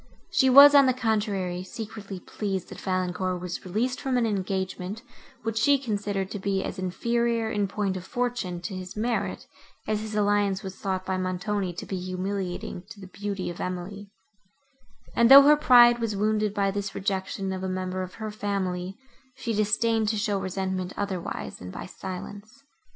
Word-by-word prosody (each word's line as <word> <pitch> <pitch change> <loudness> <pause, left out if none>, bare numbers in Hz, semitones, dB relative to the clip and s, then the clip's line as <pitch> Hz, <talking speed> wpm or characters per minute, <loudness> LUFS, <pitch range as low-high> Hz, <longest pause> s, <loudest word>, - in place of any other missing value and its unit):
She 265 -2 +4
was, 280 +3 +10
on 280 -2 +7
the 255 - +2
contrary, 205 -6 -1
secretly 205 0 -7
pleased, 190 -1 -4
that - - -9
Valancourt 185 0 -1
was 180 0 -5
released 225 +8 -1
from 265 -3 0
an 240 - +2
engagement, 190 0 -3 0.4
which 225 0 -1
she 285 +5 +5
considered 205 -6 -2
to 205 - -4
be 195 0 -1
as - - -5
inferior, 230 +4 0
in 205 -1 0
point 195 -1 -2
of 185 - -5
fortune, 240 -7 -2
to 175 +3 -5
his 185 +1 -7
merit, 230 +2 -1 0.4
as 215 0 -1
his 215 -1 -5
alliance 205 -1 +2
was 190 -1 -6
thought 190 -1 -3
by 190 -1 -1
Montoni 185 +1 -2
to 170 - -7
be 190 - -4
humiliating 185 0 -4
to 225 -3 -11
the 190 - -9
beauty 195 0 -4
of 170 - -8
Emily; 190 +3 -5 1.1
and, 235 0 +5
though 275 +1 +12
her 295 +2 +7
pride 240 -4 +7
was 225 -3 -1
wounded 215 +1 +1
by 200 -1 +1
this 200 0 -4
rejection 190 0 -2
of 185 - -4
a 190 - -2
member 185 0 -3
of 185 0 -6
her 220 -1 -5
family, 195 -3 -3 0.4
she 230 -3 -3
disdained 220 +1 +2
to 220 - 0
show 205 -1 0
resentment 190 -1 -3
otherwise, 195 -4 -4
than 90 - -9
by - - -7
silence. 205 +7 -8
200 Hz, 175 wpm, -26 LUFS, 185-220 Hz, 1.1 s, though